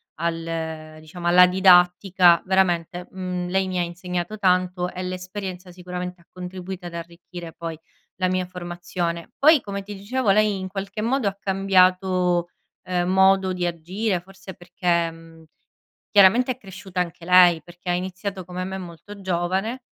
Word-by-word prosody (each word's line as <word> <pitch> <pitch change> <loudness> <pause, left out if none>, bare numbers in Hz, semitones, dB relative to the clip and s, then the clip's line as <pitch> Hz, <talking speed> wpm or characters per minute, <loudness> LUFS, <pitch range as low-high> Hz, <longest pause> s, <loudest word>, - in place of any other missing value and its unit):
al 160 -1 -4
diciamo 170 +3 -7
alla 180 +1 +7
didattica; 180 -1 +5
veramente, 180 -2 0
mhmm, 180 -1 -4
lei 190 0 +1
mi 185 -1 -2
ha - - +2
insegnato 180 +3 -4
tanto 180 -2 +1
e 185 - -5
l'esperienza 185 0 -6
sicuramente 180 0 -7
ha 170 - -28
contribuito 180 0 -7
ad 175 - -7
arricchire 170 0 -9
poi 165 -1 -6 0.4
la 185 -1 +1
mia 185 0 0
formazione. 175 -1 -5
Poi 310 +1 +6
come 200 -4 -5
ti 205 +1 -8
dicevo 215 +3 -2
lei 210 -1 +2
in 190 - -5
qualche 195 +2 -5
modo 240 +1 0
ha 200 - -1
cambiato, 185 -2 +2 0.3
ehm, 180 -1 -1
modo 190 0 +4
di 180 -1 -2
agire 180 +4 -2
forse 190 +1 -12
perché 175 -1 -1
mhmm, 165 0 -15 0.7
chiaramente 220 +6 +5
è - - -23
cresciuta 190 -2 -8
anche 170 -1 -6
lei. 180 -2 +6
Perché 175 +1 -10
ha 175 - +2
iniziato 185 +1 -4
come 180 +1 -5
me 190 +1 -5
molto 185 +3 -10
giovane, 190 +7 -1
180 Hz, 155 wpm, -23 LUFS, 175-190 Hz, 0.7 s, alla